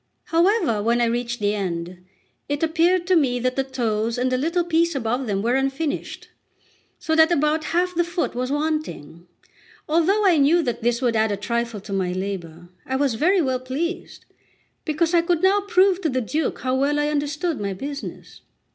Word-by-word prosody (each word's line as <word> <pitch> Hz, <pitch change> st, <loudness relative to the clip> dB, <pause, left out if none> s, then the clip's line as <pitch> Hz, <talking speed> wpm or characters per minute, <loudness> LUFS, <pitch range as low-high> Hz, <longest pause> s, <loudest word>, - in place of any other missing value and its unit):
However, 335 Hz, -, +2 dB
when 235 Hz, +3 st, +1 dB
I 240 Hz, -, +3 dB
reached 240 Hz, +1 st, -2 dB
the 205 Hz, 0 st, +1 dB
end, 180 Hz, -2 st, -4 dB, 0.5 s
it 290 Hz, +2 st, -1 dB
appeared 345 Hz, +2 st, +2 dB
that 255 Hz, -8 st, +1 dB
the 270 Hz, -, +1 dB
toes 230 Hz, -3 st, -2 dB
and 255 Hz, +1 st, 0 dB
a -, -, +3 dB
little 335 Hz, +6 st, 0 dB
piece 335 Hz, -1 st, +1 dB
above 245 Hz, 0 st, -1 dB
them 200 Hz, -1 st, -1 dB
were 235 Hz, +2 st, +1 dB
unfinished, 270 Hz, +3 st, -2 dB, 0.7 s
so 320 Hz, -, -1 dB
that 320 Hz, +1 st, +5 dB
about 305 Hz, 0 st, +1 dB
half 360 Hz, +3 st, 0 dB
the 345 Hz, 0 st, +2 dB
foot 345 Hz, +1 st, -2 dB
was 255 Hz, +2 st, -3 dB
wanting. 290 Hz, -, -3 dB, 0.6 s
Although 350 Hz, +7 st, +2 dB
I 360 Hz, -4 st, +5 dB
knew 310 Hz, +4 st, +4 dB
that 240 Hz, -4 st, -3 dB
this 240 Hz, +2 st, 0 dB
would 235 Hz, -2 st, +1 dB
add 220 Hz, -1 st, +2 dB
a 200 Hz, -, -1 dB
trifle 235 Hz, +1 st, -2 dB
to 200 Hz, 0 st, -7 dB
my 185 Hz, -2 st, -1 dB
labour, 175 Hz, -3 st, -5 dB
I 265 Hz, -, -3 dB
was 270 Hz, -2 st, +1 dB
very 350 Hz, -, +2 dB
well 260 Hz, -2 st, 0 dB
pleased, 315 Hz, +8 st, -5 dB, 0.6 s
because 325 Hz, +1 st, 0 dB
I 340 Hz, -, +5 dB
could 340 Hz, 0 st, 0 dB
now 395 Hz, +2 st, +4 dB
prove 385 Hz, -2 st, +3 dB
to 325 Hz, -, 0 dB
the 255 Hz, -1 st, 0 dB
Duke 295 Hz, +6 st, -2 dB
how 255 Hz, 0 st, -1 dB
well 280 Hz, +3 st, +1 dB
I 295 Hz, 0 st, +1 dB
understood 300 Hz, +3 st, -2 dB
my 200 Hz, -1 st, -2 dB
business. 280 Hz, +7 st, -8 dB
275 Hz, 185 wpm, -22 LUFS, 230-330 Hz, 0.7 s, that